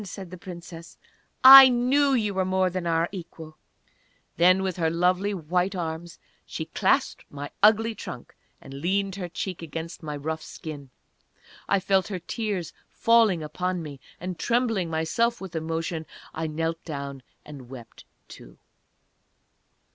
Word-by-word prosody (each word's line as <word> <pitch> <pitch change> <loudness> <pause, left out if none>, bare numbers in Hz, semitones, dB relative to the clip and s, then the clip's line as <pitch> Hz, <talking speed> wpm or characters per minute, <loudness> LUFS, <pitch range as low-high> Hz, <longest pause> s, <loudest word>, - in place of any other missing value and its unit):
said 190 -2 -9
the - - -7
Princess, 170 -2 -10 0.5
"I 265 0 +12
knew 265 +3 +2
that 255 - +3
you 210 -2 -2
were 190 0 0
more 185 0 +1
than 180 -1 -3
our 165 0 +1
equal!"... 165 -4 -10 0.8
Then, 185 +2 +4
with 185 -2 -2
her 165 -2 +1
lovely 180 +4 +1
white 180 +1 -1
arms 165 -1 -5 0.3
she - - -6
clasped - - 0
my 145 0 -7
ugly 220 +2 +4
trunk, 125 - -9 0.3
and 135 - -12
leaned 190 +7 -1
her 180 -3 -5
cheek 180 +1 -5
against 165 +1 -7
my 150 -2 -5
rough 160 +2 -4
skin. 145 -3 -9 0.8
I 200 - +3
felt 190 0 +1
her 200 -3 -4
tears 185 -2 -4 0.2
falling 225 -8 +3
upon 180 +3 -3
me, 145 -3 -9 0.2
and 180 -1 -6
trembling 230 -5 0
myself 165 +9 0
with 190 -3 -9
emotion, 160 0 -3 0.3
I 160 0 -3
knelt 165 +1 -3
down 140 -3 -6 0.2
and 135 -5 -11
wept, 125 -3 -12 0.2
too. - - -14
175 Hz, 145 wpm, -25 LUFS, 160-195 Hz, 0.8 s, I